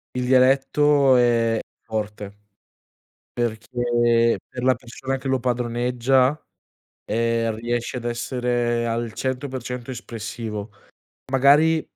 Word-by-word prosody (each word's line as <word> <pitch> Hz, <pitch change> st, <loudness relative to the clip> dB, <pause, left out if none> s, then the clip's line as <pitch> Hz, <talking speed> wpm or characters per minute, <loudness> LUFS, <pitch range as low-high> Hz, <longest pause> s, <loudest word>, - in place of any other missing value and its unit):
Il 125 Hz, -, -1 dB
dialetto 135 Hz, +2 st, +4 dB
è 115 Hz, -2 st, +3 dB, 0.3 s
forte 105 Hz, -2 st, -5 dB, 1.0 s
perché 120 Hz, 0 st, +1 dB
per 125 Hz, -, -6 dB
la 130 Hz, 0 st, +5 dB
persona 130 Hz, +2 st, -5 dB
che 130 Hz, +1 st, -7 dB
lo 130 Hz, 0 st, +1 dB
padroneggia, 125 Hz, +3 st, +1 dB, 0.6 s
ehm, 115 Hz, 0 st, 0 dB
riesce 120 Hz, +2 st, -3 dB
ad 120 Hz, -, -6 dB
essere 120 Hz, 0 st, -1 dB
al 115 Hz, 0 st, -2 dB
100% 130 Hz, -1 st, -4 dB
espressivo. 110 Hz, -2 st, -6 dB, 0.6 s
Magari 150 Hz, +4 st, +5 dB
120 Hz, 95 wpm, -23 LUFS, 115-130 Hz, 1.0 s, la